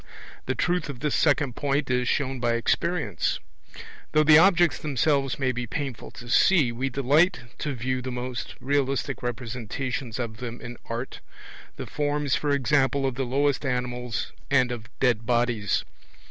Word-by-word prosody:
The - - 0
truth 175 -3 0
of 130 -3 -7
this 150 -1 0
second 140 -4 +2
point 140 -1 0
is 125 0 +1
shown 135 -1 0
by 120 -1 +1
experience: 115 - 0 0.8
though 155 - +5
the 155 0 +8
objects 175 -2 +4
themselves 140 -2 +1
may 130 -2 +1
be 125 -1 -4
painful 135 -3 -4
to 120 - -9
see, 145 0 +4
we 130 +3 -2
delight 145 +6 +3 0.2
to 145 -3 -2
view 130 +2 -2
the 130 - -5
most 125 -1 -5
realistic 135 0 -1
representations 120 0 -4
of 115 -3 -4
them 120 0 -6
in 120 0 -8
art, 115 +3 -5 0.6
the - - -6
forms 145 -1 -1
for 150 - 0
example 140 0 +2
of 135 - 0
the 135 +1 -2
lowest 140 +3 +1
animals 125 -3 -2 0.2
and 130 -3 +3
of 115 -2 -6
dead 120 -3 +1
bodies. 120 -4 +1
130 Hz, 160 wpm, -26 LUFS, 120-145 Hz, 0.8 s, the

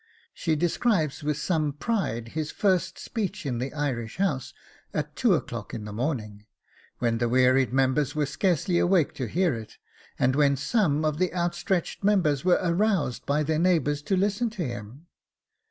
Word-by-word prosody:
She 160 -2 0
describes 165 - 0
with 150 0 0
some 155 -2 0
pride 145 - -2
his 155 +3 -3
first 190 -1 +1
speech 205 -5 -4
in 125 -4 -2
the 130 +2 -3
Irish 130 -7 -3
House 165 -10 -1 0.4
at - - -3
two - - +3
o'clock - - -5
in 110 -2 -6
the 105 - -7
morning, 110 -5 -3 0.5
when 115 -1 0
the 120 0 +1
wearied 130 +1 +4
members 135 +2 +1
were 150 -1 +1
scarcely 175 +3 +1
awake 175 -4 +3
to 130 - -4
hear 175 - +1
it, 110 -2 -8 0.4
and 130 +1 +2
when 140 -1 +3
some 155 - +1
of 155 0 0
the 185 -1 +1
outstretched 175 +2 -1
members 175 -9 +2
were 180 -1 +4
aroused 180 - 0
by 150 +2 +2
their 155 +1 0
neighbours 160 -5 +2
to 190 +6 0
listen 205 +5 +1
to 205 -6 -4
him! 120 +5 -7
150 Hz, 170 wpm, -26 LUFS, 130-180 Hz, 0.5 s, wearied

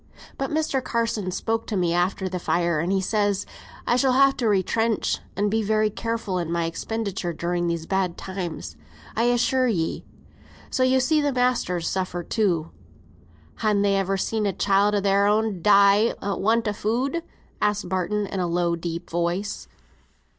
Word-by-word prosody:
But 270 - -3
Mr. 305 -4 0
Carson 230 -6 -1
spoke 225 +5 -2
to 210 - -2
me 175 -2 +1
after 180 +2 0
th' 180 -1 -4
fire, 170 -3 +1
and 190 +4 0
says 205 -1 +1
he, - - -23 0.4
'I 240 - +2
shall 260 0 +3
ha' 275 +1 +6
to 235 -4 +1
retrench, 220 +3 +1 0.2
and 205 +1 0
be 220 +1 +1
very 215 0 +1
careful 225 -4 -2
in 170 -1 -3
my 170 -1 0
expenditure 195 +1 -3
during 175 +1 -1
these 170 -1 -2
bad 190 -1 -1
times, 170 - -5 0.4
I 230 - +2
assure 245 +2 +2
ye;' 170 -8 -1 0.7
so - - 0
yo 255 0 +4
see 300 +4 +2
th' 285 -2 0
masters 245 -9 +1
suffer 185 -2 -2
too." 175 -6 0 0.9
"Han 210 -2 +1
they 200 -1 +3
ever 195 0 0
seen 215 +2 -1
a 195 - 0
child 200 +2 +2
o' 205 - +1
their'n 200 0 +2
die 200 +3 +5
for 200 0 -2
want 225 +3 +1
o' 210 - 0
food?" 250 +11 -1 0.4
asked 210 -2 0
Barton, 190 +3 -1
in 195 - -4
a 180 - 0
low, 170 0 +1
deep 170 +1 -5
voice. 175 +4 -2
200 Hz, 170 wpm, -24 LUFS, 180-225 Hz, 0.9 s, ha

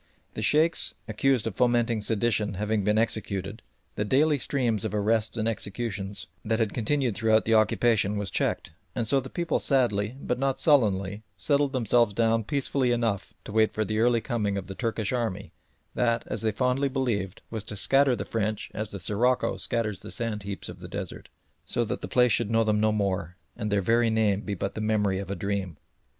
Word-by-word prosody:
The - - -5
Sheikhs 155 +9 +3
accused 125 +2 +1
of 110 -4 -3
fomenting 120 -2 +2
sedition 110 -1 +1
having 105 +1 0
been 105 +2 +2
executed, 105 -2 -1 0.3
the 105 - -1
daily 145 +6 +3
stream 120 -5 0
of - - -2
arrests 110 +2 +1
and 110 0 0
executions 100 -3 -3 0.2
that 110 +1 0
had 110 -3 0
continued 125 +1 0
throughout 110 -1 +3
the 115 - +2
occupation 110 -1 +3
was 100 -3 -3
checked, - - -1 0.2
and 120 - -1
so 135 +5 +3
the - - -7
people 170 -1 -1
sadly, 120 -4 +1
but 125 -2 -2
not 135 0 0
sullenly, 105 - +2 0.2
settled 145 -1 +1
themselves 120 -3 +2
down 115 -1 +2
peacefully 140 -2 0
enough 115 -5 -1
to - - -8
wait 110 0 +3
the 110 0 -1
early 120 0 +3
coming 105 -5 -1
of 95 - -4
the 95 - -7
Turkish 115 0 -2
army 110 -6 -2 0.4
that, 115 -1 +1
as - - -3
they 110 -1 +1
fondly 130 +5 +1
believed, 110 -8 -2
was 110 -3 -4
to 105 - -6
scatter 135 +5 +4
the 100 -3 -5
French 110 -1 -2
as 110 -1 -4
the 100 - -6
sirocco 115 +8 +1
scatters 105 -5 -2
the - - -9
sand 115 -3 -3
heaps 100 0 -6
of - - -9
the - - -8
desert, - - -6 0.3
so - - -1
that - - -4
the - - -4
place 125 -1 +3
should 105 0 +1
know 115 0 +3
them 105 -1 +1
no 110 0 +3
more, 95 -5 -1 0.2
and 105 -3 -3
their 100 -1 +2
very 115 +3 +3
name 110 -3 +2
be 100 -2 -4
but 95 +2 -3
as - - -32
the 110 - -5
memory 105 -3 +1
of 100 - -6
a 100 - -2
dream. 95 -3 -3
110 Hz, 200 wpm, -27 LUFS, 100-120 Hz, 0.4 s, scatter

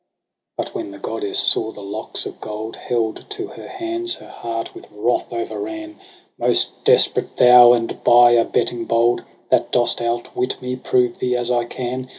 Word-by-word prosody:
But - - -4
when - - -5
the 100 - -10
goddess 105 0 -2
saw 110 0 +3
the 105 - -11
locks 105 +3 -3
of - - -9
gold 110 +1 -6
Held 115 -3 -2
to 405 -2 -4
her - - -11
hands, 345 -1 -3
her - - -14
heart 115 -1 -5
with - - -12
wrath 105 +4 -1
o'erran: 325 - -5 0.2
' 365 - -33
Most - - +1
desperate 470 +2 +2
thou, 125 -1 +8
and 115 -1 -2
by 120 0 +7
abetting 115 0 +1
bold, 115 +1 +2 0.3
That - - +2
dost 120 -1 +1
outwit 120 +2 -2
me, 125 0 -4
prove 125 -1 0
thee 125 0 0
as 120 0 -2
I 120 -1 +1
can. 125 +1 -5
120 Hz, 170 wpm, -20 LUFS, 115-125 Hz, 0.3 s, thou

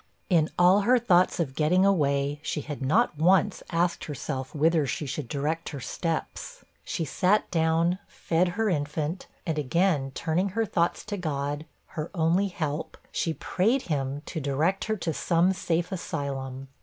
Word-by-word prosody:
In 160 -3 +4
all 180 +3 +6
her 250 +5 +4
thoughts 185 -8 +3
of 145 -6 -1
getting 170 +7 +3
away, 145 -6 +2
she 150 - -2
had 145 -1 -7
not 155 - +2
once 190 +4 +3
asked 170 +1 0
herself 135 -2 -5
whither 155 0 +3
she 150 - -2
should 140 0 -4
direct 150 +5 -2
her 145 - -6
steps. 165 - -4 0.2
She 165 - -2
sat 185 +8 +1
down, 165 +2 +2
fed 170 +2 0
her 225 -1 +2
infant, 150 0 -2 0.2
and 160 -3 -1
again 150 -1 +1
turning 175 +5 0
her 225 - +3
thoughts 170 -3 0
to 205 -1 -4
God, 145 -3 -3 0.2
her 155 +1 -5
only 170 +4 +2
help, 155 -5 -4
she 165 -2 -1
prayed 215 - +1
him 140 +1 -2
to 165 - -4
direct 150 +8 0
her 220 0 -1
to 170 -3 -2
some 175 +4 +2
safe 175 -1 -1
asylum. 135 -7 -4
165 Hz, 160 wpm, -27 LUFS, 145-180 Hz, 0.2 s, all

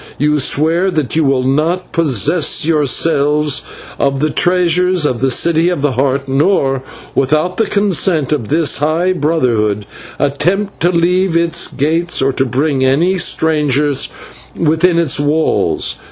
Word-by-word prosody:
You 150 +1 +1
swear 165 +7 +1
that 155 -7 -2
you 160 - +2
will 135 -2 +1
not 155 +7 -1
possess 155 - +1
yourselves 150 -1 +1 0.4
of 140 -1 0
the 155 +1 0
treasures 180 0 +1
of 125 -5 -1
the 135 - +2
City 165 +5 +2
of 175 -6 -3
the 145 - +1
Heart, 135 +2 -1
nor, 135 -1 +1 0.3
without 155 +7 0
the 225 - +1
consent 190 -7 0
of 140 -8 -1
this 155 +1 +1
high 160 +5 0
Brotherhood, 120 - 0 0.3
attempt 175 +9 -1
to 175 - +2
leave 180 +1 +1
its 170 -1 0
gates 165 +5 -1
or 135 0 +1
to 135 +1 -1
bring 135 +2 -1
any 165 +8 +1
stranger 150 -3 +1 0.6
within 165 +2 +1
its 165 -4 +1
walls. 150 +2 0
155 Hz, 140 wpm, -14 LUFS, 140-170 Hz, 0.6 s, you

